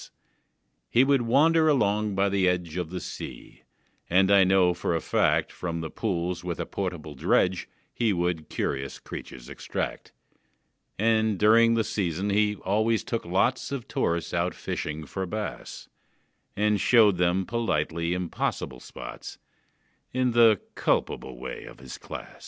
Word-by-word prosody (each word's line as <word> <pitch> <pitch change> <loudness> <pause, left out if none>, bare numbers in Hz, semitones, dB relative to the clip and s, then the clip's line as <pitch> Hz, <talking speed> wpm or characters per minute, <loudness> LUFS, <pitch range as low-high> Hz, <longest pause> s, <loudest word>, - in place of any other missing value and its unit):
He 125 - +5
would 135 -1 +3
wander 155 +7 +4
along 105 -6 +1
by 100 +1 +2
the 95 -2 +2
edge 90 -3 -2
Of 90 -3 -3
the 90 +1 -4
sea, - - -9 0.5
and 95 +3 +4
I 100 -1 +7
know 95 -1 +4
for 85 -1 -2
a - - +1
fact - - +1
From 85 -2 -4
the 80 - -5
pools 90 -4 -2
with 85 -3 -4
a - - -2
portable 90 -6 -4
dredge 90 +6 +1 0.2
He 115 -3 +1
would 85 -4 -1
curious 70 -1 -3
creatures - - -9
extract: - - -5 0.9
And, 110 -1 +2
during 115 +3 +5
the 115 - +2
season, 95 -1 -2
he 105 +1 +2
always 110 +4 0
took 115 - -3
lots 95 +12 0
Of 135 -3 -4
tourists 85 -13 -1
out 90 +1 0
fishing 75 0 -4
for 95 +5 -4
bass, 105 +3 -6 0.7
And 105 -1 +2
showed 110 -6 +5
them 90 +2 +1
politely 85 -7 -1
impossible 90 -7 -3
spots, - - -9 0.7
In 130 -1 +1
the 115 -4 +5
culpable 65 -2 -1
way 65 +1 -7
of - - -12
his 65 0 -9
class. - - -9
95 Hz, 145 wpm, -26 LUFS, 85-110 Hz, 0.9 s, I